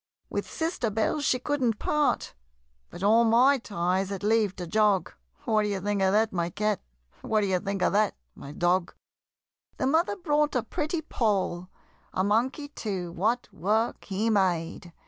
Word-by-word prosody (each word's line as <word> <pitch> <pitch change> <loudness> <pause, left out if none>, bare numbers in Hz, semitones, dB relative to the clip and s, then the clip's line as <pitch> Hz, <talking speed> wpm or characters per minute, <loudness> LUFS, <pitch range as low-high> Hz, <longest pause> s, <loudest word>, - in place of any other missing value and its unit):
With - - -3
sister 320 -8 -2
Belle 220 +8 0
she 260 -2 +2
couldn't 250 -4 0
part, 300 -1 0 0.6
But 180 - -9
all 225 +3 +5
my 250 +5 +5
ties 185 -2 -1
had 200 -1 -5
leave 210 -2 +2
to 180 - -6
jog 205 +1 +2 0.3
What 220 -4 +2
d'ye 205 -2 -1
think 205 +1 -1
of 190 0 +3
that, 215 +1 +2
my 170 -2 -1
Cat? 210 +1 -1 0.4
What 215 -1 +1
d'ye 190 -3 +1
think 195 -1 -3
of - - +2
that, 210 0 +2 0.2
my 140 - -10
Dog? 175 +2 0 0.8
The - - -1
mother 325 +8 +2
brought 300 -6 0
a 245 - +1
pretty 310 +2 -3
Poll 195 - -1 0.4
A 185 - +1
monkey 245 +8 0
too, 190 -10 -4
what 220 +8 0
work 215 +6 0
he 210 +4 -1
made! 175 -4 0
210 Hz, 165 wpm, -27 LUFS, 190-245 Hz, 0.8 s, all